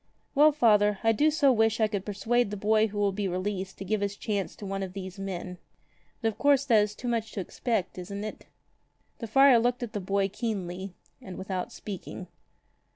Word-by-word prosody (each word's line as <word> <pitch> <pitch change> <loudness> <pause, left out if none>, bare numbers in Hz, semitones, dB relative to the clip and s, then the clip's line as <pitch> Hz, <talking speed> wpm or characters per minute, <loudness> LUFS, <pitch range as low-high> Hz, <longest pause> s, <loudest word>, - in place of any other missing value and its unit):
"Well, 300 +2 +6
father, 210 -7 +4
I 225 - +5
do 295 +8 +3
so 290 -3 +4
wish 225 -2 +2
I 220 - +4
could 200 -2 -4
persuade 225 +3 +1
the 210 - -5
boy 215 +2 +3
who 205 0 -8
will 205 -1 +2
be 200 +1 -2
released 190 +1 -3
to 195 - -7
give 215 +2 0
his 200 0 -1
chance 200 -2 -3
to 210 - -9
one 195 0 -3
of 190 -1 -5
these 190 0 -7
men. 180 -2 -5 0.6
But 225 - +3
of 215 - -9
course 285 -1 +4
that 225 -5 +5
is 210 0 -2
too 245 - -6
much 225 -2 -1
to - - -4
expect, 195 0 -2
isn't 200 +3 -6
it?" 215 - -7 0.7
The 230 - -5
friar 270 +2 +6
looked 245 +1 0
at 230 - -6
the 205 - -2
boy 195 +1 +1
keenly 195 -4 -4 0.3
and 185 -2 -9
without 190 -1 -4
speaking. 195 -2 -7
210 Hz, 210 wpm, -28 LUFS, 195-230 Hz, 0.7 s, Well